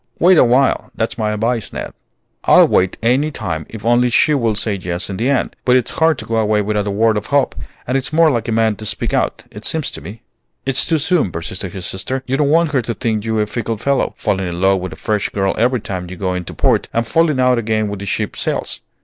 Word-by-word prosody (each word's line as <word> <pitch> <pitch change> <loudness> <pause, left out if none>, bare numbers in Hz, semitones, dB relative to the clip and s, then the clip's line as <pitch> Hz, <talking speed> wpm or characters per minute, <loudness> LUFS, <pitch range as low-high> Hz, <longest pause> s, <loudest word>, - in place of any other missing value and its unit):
Wait 180 +2 +5
awhile; 130 -1 +3
that's 115 - -2
my 110 -2 -1
advice, 110 +2 -1
Ned." - - -6 0.5
"I'll - - +7
wait 90 0 +1
any 130 +6 +2
time 80 - -4
if 110 -1 -9
only 120 +1 +3
she 150 +5 +3
will 115 -6 +1
say 105 +1 -1
yes 90 0 -4
in 95 - -4
the 120 +6 0
end. 140 - 0
But 125 - +4
it's 125 -3 +1
hard 160 -2 +3
to - - -7
go 115 - -1
away 105 -1 +2
without 105 0 -1
a - - 0
word 110 +2 +2
of 105 - -4
hope, 140 -1 +2 0.3
and 125 - -2
it's 135 0 -1
more 160 0 +4
like 120 -3 -2
a - - -1
man 110 -1 +2
to 110 - -8
speak 100 - -2
out, - - 0
it - - -10
seems - - -2
to - - -8
me." 105 +9 -10 0.4
"It's 135 -1 +4
too 165 - +2
soon," 155 - +1
persisted 90 +3 -5
his 95 -2 -6
sister. 130 +9 -3
"You 130 - -1
don't 140 0 +1
want 165 0 +3
her 135 -4 +2
to 115 0 -4
think 110 -2 -2
you 110 -1 0
a - - +1
fickle 115 +1 -3
fellow, 140 +5 0
falling 95 -1 -1
in 85 0 -4
love 95 +1 +3
with 90 -1 -5
a - - -8
fresh 105 +5 -1
girl 95 -1 0
every 125 +2 +2
time 90 -3 -5
you 95 - -7
go 95 0 -2
into 90 -1 -5
port, - - +1
and 115 0 0
falling 155 +1 +2
out 125 -1 +3
again 110 -1 0
when 100 -1 -5
the 100 - -6
ship - - -2
sails. - - -3
115 Hz, 250 wpm, -18 LUFS, 100-130 Hz, 0.5 s, I'll